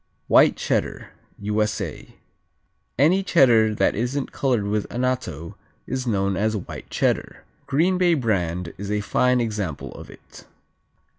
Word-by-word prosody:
White - - +5
Cheddar - - -2 0.3
U.S.A. 105 +1 -3 0.8
Any 165 +9 +4
Cheddar 120 - +4
that - - +2
isn't 125 +5 -2
colored 125 -6 0
with 105 0 -2
anatto 125 - -3 0.3
is 130 -1 -3
known 100 -3 0
as 110 +2 0
White 95 - -8
Cheddar. - - -1 0.2
Green 175 +6 +2
Bay 175 -2 +4
brand 90 - -1
is 100 0 -5
a 105 0 0
fine 125 +4 +2
example 105 -10 -3
of - - -11
it. - - -15
110 Hz, 130 wpm, -23 LUFS, 100-130 Hz, 0.8 s, White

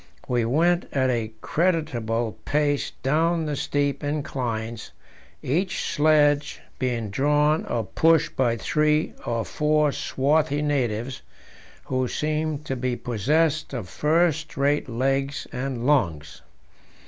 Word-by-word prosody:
We 120 -2 +1
went 170 +8 +2
at 130 -2 +2
a 115 -3 -2
creditable 120 - -1
pace 145 -1 0
down 160 +4 +2
the 150 -1 -2
steep 145 0 -1
inclines, 120 -6 -3 0.5
each 175 +8 -1
sledge 145 -1 +3 0.2
being 120 -5 -2
drawn 150 +5 +2
or 115 -2 -1
pushed 165 - +2
by 120 -3 +1
three 150 +5 +1
or 115 -1 -1
four 150 -1 +2
swarthy 145 +2 0
natives, 130 -4 -1 0.6
who 130 -1 0
seemed 155 +1 -2
to 135 - -2
be 125 -1 -1
possessed 150 +8 0
of 105 - -4
first 160 - +1
rate 140 0 +1
legs 135 +3 -1
and 125 -2 -3
lungs. 85 - 0
140 Hz, 115 wpm, -24 LUFS, 120-150 Hz, 0.6 s, sledge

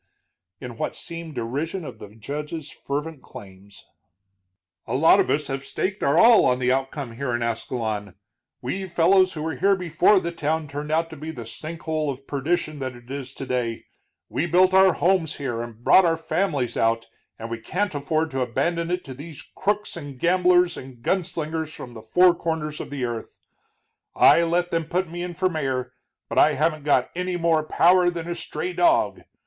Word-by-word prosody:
in 120 -3 -8
what - - -3
seemed 165 -2 -7
derision 145 +9 -3
of - - -9
the 105 - -9
judge's 150 +6 -6
fervent 145 +1 -5
claims. 100 0 -13 1.0
"A 115 - -2
lot 160 +5 +6
of - - +2
us 150 +1 +1
have 135 0 -4
staked 190 +6 -3
our 140 +3 +2
all 230 +3 +7
on 125 - +2
the 125 0 +1
outcome 135 0 -2
here 130 -2 -1
in 120 - -1
Ascalon, 110 -3 -3 0.5
we 190 0 -3
fellows 185 +2 +4
who 155 -2 -5
were 160 -4 -3
here 195 +5 +3
before 180 +2 +3
the 170 -1 -3
town 160 -1 -2
turned 145 +2 -5
out 165 +1 +1
to - - -7
be 155 +2 -7
the 120 -7 -7
sink 160 +8 -6
hole 155 -2 -1
of 135 0 -6
perdition 150 +2 -1
that 130 -2 -4
it 120 +1 -14
is 135 -2 -5
today. 125 -4 -3 0.4
We 170 - -1
built 185 +2 +4
our 190 -1 +6
homes 175 -4 +1
here, 120 -5 -3
and 120 -1 -9
brought 190 - +7
our 165 -2 +2
families 160 -7 -1
out, 115 0 +1 0.3
and 115 +1 -7
we 115 - -3
can't 185 - -2
afford 155 +2 -1
to 135 -1 -2
abandon 165 +8 -1
it 180 +1 -1
to 130 - -8
these 150 +3 -9
crooks 210 +1 -1
and 145 -5 -8
gamblers 180 +2 +3
and 130 -3 -11
gun 190 +5 +1
slingers 160 -1 -4
from 125 -5 -9
the 110 - -9
four 175 +11 +5
corners 160 -3 -3
of - - -8
the 140 -3 -3
earth. 120 -2 -6 0.8
I - - +6
let 175 +1 0
them 165 -1 0
put 175 +1 -2
me 175 +1 -5
in 175 -1 -5
for 185 +1 +1
mayor, 130 -7 -2 0.3
but - - 0
I - - +6
haven't 155 0 0
got 130 -4 +2
any 180 0 -2
more 165 -2 +2
power 175 +3 +4
than 170 -1 -5
a 175 - -2
stray 180 +1 -4
dog. 335 - +2
155 Hz, 195 wpm, -24 LUFS, 130-175 Hz, 1.0 s, all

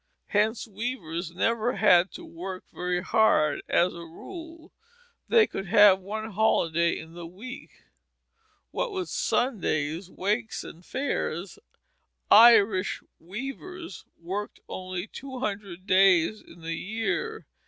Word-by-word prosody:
Hence 220 +3 +1
weavers 190 -7 -4
never 225 +7 0
had 185 -3 +5
to - - -9
work 185 +2 -7
very 180 0 -1
hard; 155 -9 +3
as 175 +1 +3
a 170 - -9
rule, 325 - -10 0.6
they 455 -2 +5
could 195 - -6
have 205 -1 +7
one 215 +3 -5
holiday 170 -5 +2
in 160 +1 -10
the 170 -1 -8
week. 230 +10 -11 0.9
What - - -2
with 375 -3 -4
Sundays, 195 - -1
wakes, 215 +5 -2
and 170 - -11
fairs, 195 - -3 0.7
Irish 210 -4 +6 0.2
weavers 270 - -7 0.2
worked 195 +5 -5
only 185 0 -5
two 265 +3 -9
hundred 200 -6 -5
days 190 0 +4
in 170 - -16
the 165 0 -4
year. 225 - -3
200 Hz, 120 wpm, -27 LUFS, 175-235 Hz, 0.9 s, have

